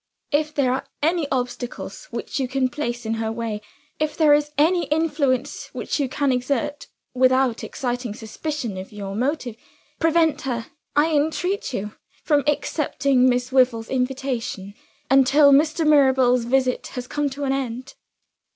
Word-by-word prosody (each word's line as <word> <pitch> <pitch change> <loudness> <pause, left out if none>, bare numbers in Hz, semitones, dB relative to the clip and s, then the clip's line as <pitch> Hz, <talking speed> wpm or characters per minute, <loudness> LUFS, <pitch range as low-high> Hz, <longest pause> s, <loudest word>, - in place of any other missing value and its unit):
If 305 +1 0
there 260 -3 +2
are 260 - -3 0.2
any 325 -1 +2
obstacles 250 - -4
which - - -5
you 265 - 0
can 260 0 0
place 245 -4 -4
in 220 - -1
her 220 0 -1
way 225 -2 -4 0.4
if 305 0 -1
there 305 -3 +5
is 295 0 +2
any 335 +3 +3
influence 290 -3 0
which - - -2
you 275 -3 0
can 280 +1 0
exert, 280 +3 -2 0.3
without 255 -1 +2
exciting 245 -4 -3
suspicion 235 -1 -5
of 190 - -9
your 200 -2 -6
motive 255 0 -1 0.4
prevent 325 -1 +2
her, 240 -4 -3 0.3
I 300 +3 +3
entreat 320 +6 0
you, 210 -3 -4 0.3
from 290 -3 +2
accepting 275 -3 +2
Miss 250 +1 0
Wyvil's 250 -4 +2
invitation, 250 -6 -2 0.4
until 275 +2 +6
Mr. 310 +3 +3
Mirabel's 265 -5 +4
visit 255 0 +1
has 250 - -3
come 290 +2 -1
to 280 +2 -6
an 270 -1 +1
end." 255 -2 -4
265 Hz, 150 wpm, -23 LUFS, 245-295 Hz, 0.4 s, until